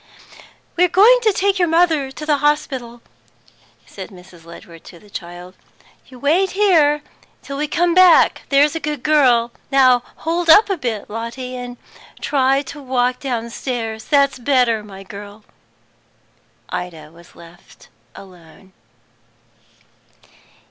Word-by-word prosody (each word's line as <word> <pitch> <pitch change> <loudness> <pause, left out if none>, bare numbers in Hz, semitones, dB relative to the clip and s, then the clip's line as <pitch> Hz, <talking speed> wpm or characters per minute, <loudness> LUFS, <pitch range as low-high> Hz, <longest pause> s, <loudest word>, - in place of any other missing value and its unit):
"We're 360 +1 +4
going 445 +8 +5
to 440 -2 +2
take 395 0 0
your 350 - +2
mother 325 -4 +2
to 305 +3 -9
the 300 -1 +1
hospital," 270 -5 -2 0.8
said - - -10
Mrs. 180 -3 -16
Ledward 170 0 -14
to 175 - -13
the 205 +4 -20
child. 175 +1 -9 0.5
"You 255 - -14
wait 330 +9 +1
here 305 -8 +3 0.4
till 275 - -7
we 300 +1 -2
come 345 +3 0
back, 365 -1 +5
there's 285 +2 +3
a - - -2
good 295 -4 -5
girl. 250 -6 +3 0.2
Now, 260 -3 +4
hold 335 +1 -3
up 410 +5 +6
a - - +1
bit, 230 -8 -4
Lotty; 245 +2 -7 0.4
try 270 -1 +1 0.2
and 285 -3 -13
walk 250 -1 0
downstairs. 235 -2 -5
That's 280 -3 +2
better, 245 -4 +1
my 195 -2 -12
girl." 205 +2 -11 1.3
Ida 160 -4 -7
was 170 +1 -19
left 170 +1 -18 0.3
alone. 185 0 -16
255 Hz, 125 wpm, -18 LUFS, 210-300 Hz, 1.3 s, up